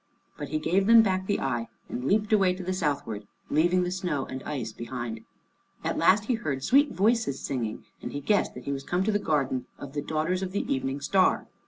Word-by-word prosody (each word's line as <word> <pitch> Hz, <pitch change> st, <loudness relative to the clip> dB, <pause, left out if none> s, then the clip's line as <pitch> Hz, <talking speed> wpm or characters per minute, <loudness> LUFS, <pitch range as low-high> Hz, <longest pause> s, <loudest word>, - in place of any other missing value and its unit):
But -, -, -5 dB
he 155 Hz, -, 0 dB
gave 185 Hz, +5 st, +1 dB
them 230 Hz, 0 st, +8 dB
back 190 Hz, -2 st, 0 dB
the 205 Hz, -, +1 dB
eye 120 Hz, -3 st, -1 dB, 0.2 s
and 125 Hz, -, -5 dB
leaped 210 Hz, +5 st, +2 dB
away 190 Hz, -3 st, +4 dB
to 185 Hz, -, -7 dB
the 185 Hz, +1 st, -1 dB
southward, 140 Hz, -, -2 dB, 0.2 s
leaving 175 Hz, +4 st, +3 dB
the 180 Hz, -, -2 dB
snow 180 Hz, -7 st, -2 dB
and 130 Hz, 0 st, -6 dB
ice 125 Hz, -7 st, -3 dB
behind. 120 Hz, -2 st, -5 dB, 0.6 s
At -, -, -1 dB
last 190 Hz, +5 st, +4 dB
he 250 Hz, -, +1 dB
heard 145 Hz, -, -2 dB
sweet 280 Hz, -, +4 dB
voices 215 Hz, -, +1 dB
singing, 115 Hz, -5 st, -3 dB, 0.2 s
and -, -, -5 dB
he 145 Hz, -, -3 dB
guessed 205 Hz, +8 st, +1 dB
that 125 Hz, -, -8 dB
he 140 Hz, -, -3 dB
was 135 Hz, -1 st, -2 dB
come 175 Hz, +5 st, 0 dB
to 215 Hz, -, +1 dB
the 205 Hz, -, +1 dB
garden 140 Hz, -8 st, 0 dB
of 140 Hz, -1 st, -9 dB
the 145 Hz, -, -2 dB
daughters 160 Hz, +5 st, -1 dB
of 190 Hz, -1 st, -4 dB
the 200 Hz, -, -1 dB
Evening 135 Hz, +1 st, -2 dB
Star. 185 Hz, +6 st, +3 dB
160 Hz, 220 wpm, -27 LUFS, 135-190 Hz, 0.6 s, them